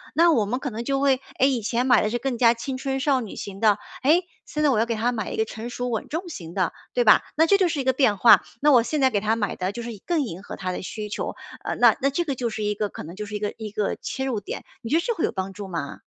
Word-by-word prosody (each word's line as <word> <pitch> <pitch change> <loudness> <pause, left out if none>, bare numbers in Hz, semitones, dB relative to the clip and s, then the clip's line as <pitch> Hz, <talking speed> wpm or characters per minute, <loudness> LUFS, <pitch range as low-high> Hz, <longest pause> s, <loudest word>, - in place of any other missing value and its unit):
那 335 +1 +6
我 230 -9 +3
们 245 +6 -2
可 275 - -3
能 230 +2 -4
就 275 +2 0
会 270 -1 +2 0.2
诶， 265 - +5
以 255 -4 0
前 235 +3 0
买 250 - +6
的 210 - +1
是 240 - -1
更 250 0 -2
加 230 -1 +5
青 255 +3 -5
春 270 0 -2
少 270 -1 +2
女 220 - -7
型 195 -1 -7
的， 215 -2 +4 0.3
诶， 320 +7 +4 0.2
现 300 - -4
在 295 - +5
我 245 -6 +2
要 225 - +3
给 230 -1 -2
她 230 +3 +1
买 220 -4 -4
一 - - -4
个 220 - +2
成 220 +2 -7
熟 245 0 -3
稳 225 -2 -3
重 335 +4 -4
型 170 - -8
的， 185 -3 0 0.2
对 245 - +2
吧？ 215 - +6
那 320 - +5
这 400 - +5
就 380 -2 +3
是 330 -4 -2
一 - - -4
个 260 0 +2
变 245 -6 +3
化， 230 - +7 0.2
那 295 +1 +5
我 250 -4 +7
现 300 +6 -2
在 265 - +5
给 205 - +1
她 215 +2 +1
买 205 -4 -2
的 185 +1 -2
就 235 - -6
是 235 - -5 0.2
更 340 -3 +2
迎 190 -7 -6
合 - - -7
她 185 -1 -3
的 - - -4
需 210 +3 -5
求， - - -4 0.3
呃， - - -2
那 - - +5
那 275 - +3
这 315 +5 -1
个 285 - -1
就 240 -2 -2
是 215 -1 -4
一 210 0 +1
个 210 0 -2
可 - - -8
能 165 +3 -9
就 210 +2 -5
是 210 - -6
一 - - -2
个 205 0 -2
一 220 -1 -6
个 210 -1 -1
切 265 - -4
入 250 -5 -1
点， 205 - -6 0.2
你 230 - -6
觉 300 - +2
得 - - +2
这 470 +6 -1
会 330 - -2
有 - - -1
帮 190 0 -4
助 200 0 -7
吗？ 165 -6 -5
235 Hz, 345 characters per minute, -24 LUFS, 210-270 Hz, 0.3 s, 化